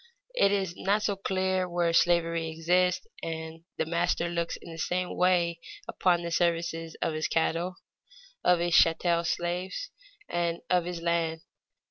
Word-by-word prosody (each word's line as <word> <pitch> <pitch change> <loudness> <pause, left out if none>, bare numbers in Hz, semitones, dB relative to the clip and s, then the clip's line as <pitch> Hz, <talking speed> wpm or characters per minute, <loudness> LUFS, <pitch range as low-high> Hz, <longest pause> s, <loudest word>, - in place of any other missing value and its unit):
It 200 - +4
is 190 -3 0
not 205 +4 +1
so 200 - +1
clear 185 -1 0
where 175 -1 +1
slavery 165 -1 +2
exists 180 - +1 0.2
and 160 0 -6
the - - 0
master 170 +1 0
looks 170 -1 -2
in 170 - -11
the 165 - -9
same 180 +2 -1
way 175 -2 +2 0.3
upon 175 -2 +1
the 170 - -4
services 165 -1 0
of 160 - 0
his 155 0 -1
cattle, 170 +3 0 0.7
of 180 - +5
his 175 0 -1
chattel 170 +1 +4
slaves, 175 - -2 0.4
and 170 -1 -1
of 180 -2 +3
his 175 -1 -5
land. 165 -1 0
170 Hz, 150 wpm, -28 LUFS, 165-180 Hz, 0.7 s, of